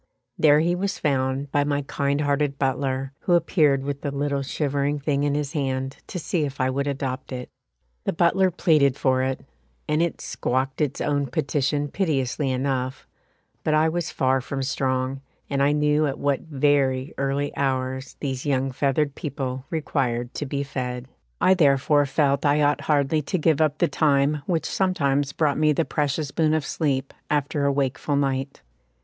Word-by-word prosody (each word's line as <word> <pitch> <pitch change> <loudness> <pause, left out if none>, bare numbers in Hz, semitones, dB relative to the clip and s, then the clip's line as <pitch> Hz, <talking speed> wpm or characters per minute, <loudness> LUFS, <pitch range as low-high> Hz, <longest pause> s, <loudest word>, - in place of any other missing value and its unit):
There 150 -1 +5
he 170 +2 +2
was 195 +2 -2
found 135 -1 -1
by 145 - +2
my 145 0 -1
kind 140 +1 -1
hearted 145 -1 0
butler, 135 0 -1
who 180 - 0
appeared 150 -5 +3
with 140 0 -4
the 145 - -2
little 140 0 -1
shivering 140 +1 -1
thing 140 -1 0
in 145 0 +1
his 145 +1 -2
hand 135 -2 -2
to - - -5
see 170 -1 -1
if 140 -1 -4
I 130 0 +1
would 140 +2 -1
adopt 135 -2 -3
it. 125 -1 -6 0.5
The - - +1
butler 175 +3 +3
pleaded 150 -6 +3
for 130 -1 +2
it, 130 0 -1 0.5
and 150 +1 +1
it 170 -1 -1
squawked 130 +3 -2
its 145 -4 -1
own 145 -1 0
petition 145 +3 0
piteously 145 -5 -1
enough, 130 0 -2 0.6
but 155 - +2
I 155 +1 +4
was 170 0 -2
far 130 0 +1
from 135 +1 -4
strong, 130 0 -1 0.3
and 140 0 +1
I 140 +1 +4
knew 150 +1 +2
at 135 - -3
what 140 -2 +1
very 140 -2 +1
early 140 +1 -1
hours 130 -1 -2
these 130 -3 -3
young 135 -2 0
feathered 140 +2 0
people 135 -3 -4
required 125 -6 -1
to 145 - -4
be 140 +1 -2
fed. 125 -2 -4 0.3
I 185 - +5
therefore 145 -3 +3
felt 140 0 +1
I 150 +1 +3
ought 145 0 +2
hardly 145 +1 +1
to 150 - -2
give 160 -2 +2
up 150 -1 +2
the 175 - +3
time 145 -1 +2
which 165 -4 0
sometimes 145 -7 +1
brought 145 -1 +1
me 155 -1 +4
the 160 +2 0
precious 145 0 -1
boon 155 0 +2
of 155 -3 -1
sleep 135 -4 -1 0.2
after 145 0 0
a 140 - +3
wakeful 140 +1 -1
night. 135 -1 -1
140 Hz, 175 wpm, -24 LUFS, 135-150 Hz, 0.6 s, There